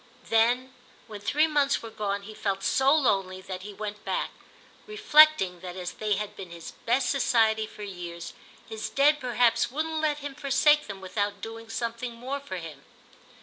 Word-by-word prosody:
Then 245 +3 +3 0.3
when 210 -3 -9
three 300 +9 +3
months 290 -5 +1
were 225 - -7
gone 200 -2 -3
he 215 +2 -9
felt 195 -2 -2
so 265 +5 +3
lonely 195 -11 +2
that 185 -1 -7
he 205 +2 -8
went 210 0 -6
back; - - -2 0.6
reflecting 310 - +5
that 180 0 -8
as 180 -1 -4
they 215 -1 -1
had 210 +1 -5
been 190 -3 -8
his 170 -1 -9 0.2
best 250 +3 +2
society 220 -5 +2
for 210 - -10
years 175 -3 -7 0.3
his 220 -1 -5
Dead 295 +2 +4
perhaps 245 -3 +2
wouldn't 315 +4 -2
let 300 -2 +1
him 285 -1 -6
forsake 295 +1 +3
them 195 -2 -7
without 205 +2 -2
doing 225 +2 -8
something 235 +1 -3
more 260 +4 -4
for 230 -10 -6
him. 165 -3 -9
225 Hz, 175 wpm, -27 LUFS, 200-275 Hz, 0.6 s, reflecting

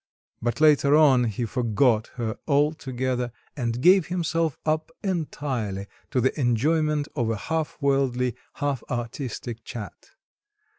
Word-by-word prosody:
But 120 +4 -1
later 150 -2 +5
on 135 -5 +5
he 115 +1 -2
forgot 115 -1 +2
her 115 -2 -3
altogether, 130 -4 0 0.2
and 120 -3 -2
gave 185 +2 +6
himself 165 -3 0
up 155 0 0
entirely 135 - -2 0.2
to 130 - 0
the 130 +2 +2
enjoyment 150 +4 +2
of 120 -5 0
a 115 - 0
half 160 +7 -2
worldly, 130 -3 +1 0.2
half 145 -5 -2
artistic 120 -1 -4
chat. 115 -6 -8
130 Hz, 120 wpm, -25 LUFS, 120-150 Hz, 0.2 s, gave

